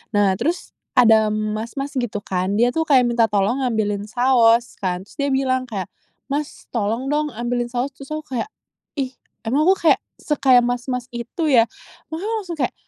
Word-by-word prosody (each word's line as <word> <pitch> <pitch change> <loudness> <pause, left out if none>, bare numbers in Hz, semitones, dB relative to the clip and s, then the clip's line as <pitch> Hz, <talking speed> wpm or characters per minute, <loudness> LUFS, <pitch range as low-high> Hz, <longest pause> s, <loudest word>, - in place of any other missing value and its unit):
nah 205 -2 +4
terus 340 +3 -2 0.2
ada 225 -3 +6
mas-mas 220 +6 -3
gitu 210 -4 -3
kan 185 +2 -1
dia 240 +3 +3
tuh 320 +2 -1
kaya 260 -4 +5
minta 235 -1 +3
tolong 210 +5 +1
ambilin 210 -3 -1
saos 240 0 +3
kan. 185 -1 -2
Terus - - -20
dia 280 - +1
bilang 260 -1 0
kayak, 195 -6 -5 0.4
"Mas, 290 +1 -4
tolong 230 +5 -1
dong 300 0 +1
ambilin 240 +1 -1
saos," 245 +3 -2
terus 275 0 -12
aku 310 - -5 0.2
kayak, - - -2 0.5
"Ih 265 -3 -2 0.3
emang 280 +9 +1
aku 380 - +6
kayak - - +5 0.2
se 300 - -1
kayak 255 -3 +6
mas-mas 245 +1 -2
itu 290 +7 -2
ya?" 230 -3 +6 0.5
makanya 390 +8 -3
langsung 350 -5 -6
kayak, 260 -4 -1
245 Hz, 175 wpm, -21 LUFS, 220-275 Hz, 0.5 s, ada